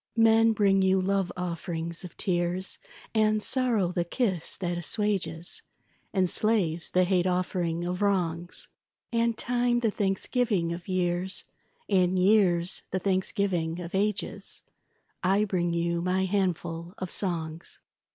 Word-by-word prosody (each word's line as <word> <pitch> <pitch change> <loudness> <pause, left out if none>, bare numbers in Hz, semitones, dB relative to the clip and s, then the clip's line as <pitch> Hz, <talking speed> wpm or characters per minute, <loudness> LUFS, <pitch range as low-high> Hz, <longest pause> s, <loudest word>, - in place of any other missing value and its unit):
Men 225 0 +5
bring 195 -2 +3
you 190 0 +3
love 195 -1 0
offerings 170 -1 -4
of 180 - -10
tears, 180 +1 -1 0.3
And 215 -1 +2
sorrow 235 -9 +2
the 175 -1 0
kiss 185 -2 -1
that 175 -2 -2
assuages, 175 -2 -1 0.5
And 190 -3 +2
slaves 175 -6 +1
the 185 - +3
hate 180 0 +2
offering 180 -2 -1
of 180 +2 -3
wrongs, 175 -4 0 0.5
And 230 -1 +1
time 245 0 +1
the 225 -3 +2
thanksgiving 195 -2 0
of 175 +1 -8
years, 185 0 -1 0.4
And 185 -1 +2
years 185 -3 +3
the 190 - -1
thanksgiving 185 -3 0
of 170 -1 -7
ages; 205 +1 -1 0.6
I 195 +3 +3
bring 175 -4 0
you 170 0 0
my 185 +2 +1
handful 175 -2 -2
of 185 -2 -5
songs. 165 -4 -2
185 Hz, 130 wpm, -28 LUFS, 175-205 Hz, 0.6 s, Men